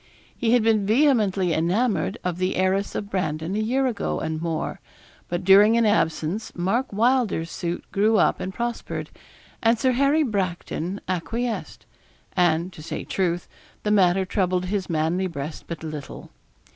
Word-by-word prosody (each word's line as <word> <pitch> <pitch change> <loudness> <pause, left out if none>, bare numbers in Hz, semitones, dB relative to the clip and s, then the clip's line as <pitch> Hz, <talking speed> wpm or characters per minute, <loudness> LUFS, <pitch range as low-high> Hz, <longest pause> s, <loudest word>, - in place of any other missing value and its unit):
He 235 -1 +1
had 245 -3 +4
been 220 -2 +3
vehemently 215 - +3
enamoured 190 +4 +1
of 180 -1 -2
the 185 +1 0
heiress 190 +2 0
of 200 0 -4
Brandon 160 -1 -2
a - - 0
year 255 +5 +1
ago 245 -5 -1
and 160 0 -3
more; 165 -2 -3 0.5
but 175 +1 -2
during 205 +4 +6
an 230 - +3
absence 195 -1 0
Mark 210 +9 0
Wylder's 220 -6 +1
suit 175 -1 -4
grew 215 +2 +3
up - - +3
and 185 - -4
prospered, 235 +3 -4 0.5
and 230 +1 +3
Sir 260 +3 +2
Harry 280 +5 +3
Bracton 190 - -2
acquiesced; 225 +6 -3 0.5
and, 175 0 +2
to 160 - -11
say 155 - -5
truth, 175 -2 -1 0.4
the 210 - 0
matter 190 -2 +4
troubled 185 -1 0
his 190 0 -2
manly 165 +3 0
breast 150 -2 -6
but 165 -2 -6
little. 155 -3 -7
190 Hz, 155 wpm, -24 LUFS, 170-225 Hz, 0.5 s, during